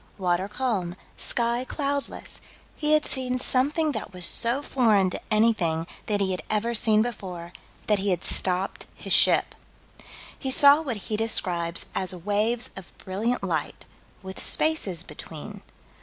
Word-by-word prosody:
water 185 0 0
calm, 205 -7 -2 0.2
sky 235 +1 0
cloudless, 280 +1 -4 0.3
he 300 0 0
had 305 0 +3
seen 255 -1 -1
something 290 +5 +1
that 220 -7 -5
was 180 -1 -1
so 240 +5 +3
foreign 215 -9 +2
to - - -4
anything 215 -7 +1 0.2
that 205 -1 0
he 195 -1 0
had 185 - -3
ever 220 +2 0
seen 215 -1 +4
before, 180 -7 -7 0.3
that 210 -2 +2
he 200 +1 -1
had 180 -3 -1
stopped 185 +1 -1
his - - -3
ship. - - +4 0.9
He 265 - -3
saw 285 +2 +7
what 260 -8 -4
he 210 +1 -4
describes 175 -6 0
as 185 -1 -2
waves 210 +6 -1
of 195 -2 -12
brilliant 210 +5 -2
light, 160 -6 -3 0.4
with 190 0 -8
spaces 205 - +2
between. 165 +6 -10
210 Hz, 145 wpm, -25 LUFS, 185-250 Hz, 0.9 s, saw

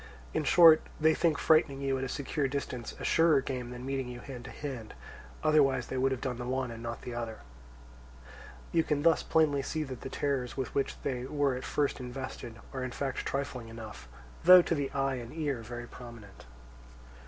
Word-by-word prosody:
In - - 0
short, 165 0 +8 0.2
they 160 0 +5
think 160 -3 +2
frightening 155 -4 +3
you 135 -1 0
at - - -3
a 135 - -3
secure 140 +1 -1
distance 130 -3 -4
a - - -7
surer 165 -3 +4
game 130 -2 -4
than 125 0 -7
meeting 135 -1 -2
you 125 0 -7
hand 125 -2 -8
to - - -7
hand; 130 -7 -7 0.5
otherwise 135 -5 +4
they 130 - -4
would 135 +1 +2
have 130 -1 -2
done 130 -3 -2
the 120 - -4
one 130 -1 -1
and 115 0 -8
not 120 0 -5
the 125 - -5
other. 115 -2 -5 1.3
You 165 -1 +3
can 150 -2 0
thus 165 -1 +5
plainly 155 -3 +2
see 155 +3 -2
that 130 -4 -7
the - - -6
terrors 135 -3 -2
with 130 -2 -3
which 140 - -1
they 125 -2 -2
were 145 0 +1
at 125 - -5
first 145 -1 0
invested 125 -2 -7
are 130 -1 -3
in 130 - -2
fact 135 +2 -3
trifling 130 -4 -3
enough, 110 - -9 0.4
though 180 +1 +10
to - - 0
the 145 -4 -1
eye 135 -1 0
and 120 -1 -7
ear 145 -7 -2
very 120 +1 -7
prominent. 120 - -12
135 Hz, 200 wpm, -30 LUFS, 125-145 Hz, 1.3 s, though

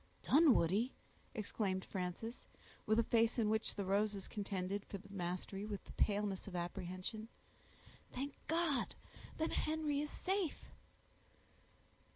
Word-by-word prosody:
"Dunwoodie!" 245 - +5 0.4
exclaimed 200 -3 -1
Frances, 190 +6 -4 0.4
with 215 +1 +4
a 230 - +5
face 230 +1 +3
in 215 -3 +3
which 220 0 +1
the 200 - -2
roses 200 0 +1
contended 200 -1 -2
for 200 - -6
the 200 +1 -14
mastery 185 +2 -3
with 210 -2 -4
the - - -11
paleness 205 -2 +1
of 190 - -6
apprehension. 185 +4 -3 0.8
"Thank 275 +2 -3
God! 325 -4 +2 0.4
then 320 - +1
Henry 305 -2 +1
is 300 - -2
safe!" 380 -2 -1
210 Hz, 125 wpm, -38 LUFS, 190-255 Hz, 0.8 s, Dunwoodie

